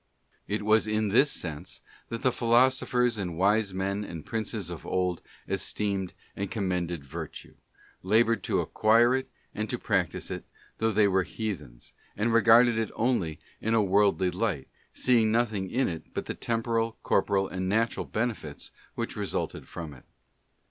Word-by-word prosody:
It 105 0 -2
was 110 0 +4
in 110 0 +1
this 130 +8 +5
sense 80 - -5 0.3
that 115 - -5
the 130 - +4
Philosophers 125 -1 +3
and 90 -4 -3
wise 100 +2 +3
men 100 +2 -2
and 85 -6 -7
princes 110 -5 -3
of 85 - -7
old 90 -2 -1 0.3
esteemed 100 -3 -2 0.2
and 100 -1 -3
commended 90 -7 -2
virtue, 70 - -8 0.5
laboured 110 +2 +3
to - - +1
acquire 115 +3 +4
it 130 0 -1 0.2
and 110 0 -3
to - - -1
practise - - -1
it, - - -4 0.4
though 110 0 +2
they 105 0 +4
were 95 -1 +3
heathens, 80 - -6 0.2
and 110 +3 +1
regarded 115 +1 +6
it 110 - -1
only 110 -10 0 0.2
in 110 +1 +1
a 110 - +4
worldly 95 -2 +3
light, 90 -7 -2 0.2
seeing 115 -4 +3
nothing 110 -5 0
in 130 +6 +1
it 80 -2 -6
but - - -2
the - - -3
temporal, 115 -1 -1
corporal, 95 -1 +2
and 95 0 -3
natural 115 +3 0
benefits 110 -10 -3 0.2
which - - -3
resulted - - -3
from 80 -3 -7
it. 65 - -16
105 Hz, 155 wpm, -28 LUFS, 95-115 Hz, 0.5 s, regarded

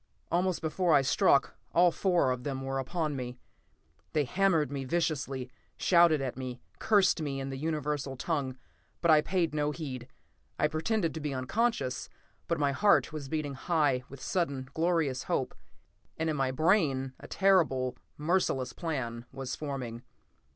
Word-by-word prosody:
Almost 180 0 +1
before 165 +1 +2
I 140 - +5
struck, 140 +1 +3 0.2
all 175 +1 +6
four 175 -8 +2
of 125 -1 -3
them 135 -1 -3
were 135 0 -2
upon 155 +2 -2
me. 125 -1 -5 0.8
They 150 - +3
hammered 165 -1 +2
me 140 -1 -3
viciously, 135 -4 -1 0.3
shouted 170 -4 +5
at 130 -2 -3
me, 125 -1 -6 0.2
cursed 200 -6 +3
me 140 -3 -2
in 135 0 -4
the - - -4
universal 150 -2 -2
tongue, 135 -2 -2 0.4
but 170 - +4
I 155 -1 +7
paid 170 -1 0
no 150 -1 +1
heed. 135 -5 -5 0.5
I 150 - +3
pretended 165 +3 0
to 160 - -5
be 145 -3 -3
unconscious, 130 - -1 0.4
but 170 - 0
my 145 -2 +2
heart 200 +1 +3
was 145 -3 -6
beating 155 -2 -2
high 145 -2 +1
with 135 -1 -10
sudden, 140 -8 -1
glorious 160 -6 +1
hope, - - -1 0.6
and 160 0 0
in - - -2
my 135 -2 +1
brain 135 -3 +2
a - - -10
terrible, 160 -10 +2 0.2
merciless 150 -5 0
plan 125 -8 -4
was 130 -1 -4
forming. 130 -6 -5
150 Hz, 160 wpm, -30 LUFS, 130-170 Hz, 0.8 s, I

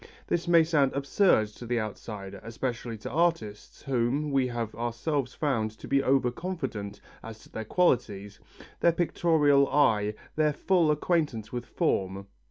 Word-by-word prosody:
This 175 0 -1
may 170 -1 +6
sound 150 -4 +2
absurd 140 - +2
to 115 +3 -11
the 120 0 0
outsider, 100 -2 -6
especially 115 0 -4
to 110 - -7
artists, 160 -11 -1
whom 135 +3 0
we 135 -2 +2
have 120 -3 -4
ourselves 120 +4 -2
found 130 -8 0
to - - -10
be 140 0 +2
over 130 -2 +2
confident 125 - -5 0.2
as 115 -1 -9
to - - -19
their 110 - -5
qualities, 105 - 0 0.4
their 170 - +4
pictorial 155 -5 +3
eye, 105 -7 +2 0.2
their 155 -1 +2
full 170 +1 +2
acquaintance 150 -8 0
with 120 -1 -4
form. 95 +1 -1
130 Hz, 150 wpm, -28 LUFS, 110-150 Hz, 0.4 s, may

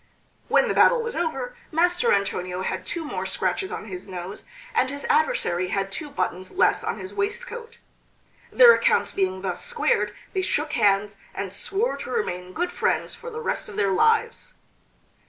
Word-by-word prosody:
When - - +4
the - - +1
battle - - +5
was 470 +1 -4
over, 270 -7 -2 0.2
Master 355 +8 +3
Antonio 185 -2 0
had - - -3
two 335 -2 -3
more - - -3
scratches 385 - -1
on - - -5
his 185 -2 -7
nose, 185 +1 -7 0.3
and 455 - +2
his 285 +1 -5
adversary 460 - +1
had 195 +1 -2
two 295 +8 -5
buttons 185 -8 -3
less 365 - +2
on - - -2
his 375 - -7
waistcoat. 470 +3 -4 0.7
Their 485 -1 +9
accounts - - +2
being 190 -1 -1
thus 185 -2 -2
squared 485 -1 0 0.2
they 380 - +1
shook 300 -4 -1
hands, 200 -1 +2 0.2
and 195 -1 -4
swore 410 - -1
to - - -6
remain 180 - -2
good 355 - -1
friends - - 0
for 485 - -8
the 460 -1 -6
rest - - -2
of 205 - -9
their 200 -1 +2
lives. 450 - +2
295 Hz, 175 wpm, -25 LUFS, -, 0.7 s, Their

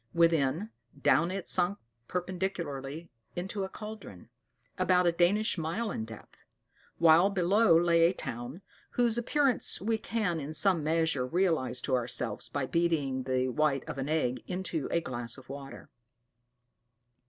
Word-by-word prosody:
Within, 165 +4 +2 0.3
down 165 +4 +3
it 190 0 -4
sunk 185 +2 +4 0.3
perpendicularly 170 -5 -4 0.2
into 190 +3 -3
a 190 - -4
caldron, 210 - -10 0.5
about 180 0 +3
a 175 - +4
Danish 180 +4 +1
mile 195 +8 -2
in 110 - -4
depth; 110 -1 -12 0.6
while 170 +3 +6
below 195 0 +4
lay 170 -1 +4
a - - -2
town, 130 - -6 0.3
whose 240 -1 +2
appearance 275 0 +2
we 220 +3 -1
can, 205 -9 -1
in 150 +2 -5
some 185 -5 +2
measure, 160 -4 +1
realize 155 -7 +1
to 135 - -2
ourselves 120 -3 -2
by 145 -2 -2
beating 145 -6 0
the 130 0 0
white 140 0 +1
of 135 - -5
an 135 +2 -3
egg 140 -6 0
in 185 +1 -4 0.2
a 170 - +1
glass 120 -4 -4
of 130 -1 -15
water. 135 0 -9
165 Hz, 140 wpm, -30 LUFS, 135-190 Hz, 0.6 s, while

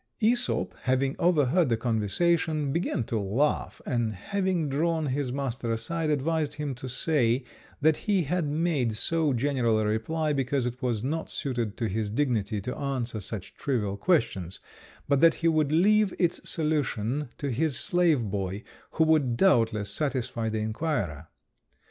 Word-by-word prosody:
Æsop 240 +3 +1
having 130 +1 +1
overheard 165 -2 +3
the 115 - +2
conversation, 145 - +1
began 165 -7 0
to 110 0 -2
laugh, 115 +10 0
and 120 -3 0
having 185 - -1
drawn 160 +3 0
his 135 -1 -1
master 130 -3 -3
aside, 160 +8 -2
advised 150 +1 0
him 145 -2 -3
to 130 +1 -8
say 130 -2 +1 0.4
that 155 +1 +4
he 200 -4 +1
had 165 +2 -1
made 145 -7 0
so 160 +3 +1
general 125 -3 +1
a 110 - 0
reply 150 +9 0
because 135 -1 0
it 125 +2 -4
was 120 -4 -1
not 160 +5 -2
suited 120 -6 -3
to 115 - -1
his 110 +1 -2
dignity 110 -4 0
to 125 +6 -4
answer 130 -5 -3
such 100 -1 -6
trivial 110 -9 -1
questions, 100 - 0 0.5
but 140 -1 +3
that 165 -1 +6
he 165 - 0
would 155 -3 +2
leave 205 +4 +4
its 175 -2 0
solution 145 -4 -1
to 140 -2 -3
his 140 +3 0
slave 175 - +2
boy, 100 0 -3 0.3
who 160 - +3
would 150 -7 +2
doubtless 115 - +3
satisfy 125 -4 -1
the 110 - -2
inquirer. 110 - -2
135 Hz, 155 wpm, -27 LUFS, 115-160 Hz, 0.5 s, that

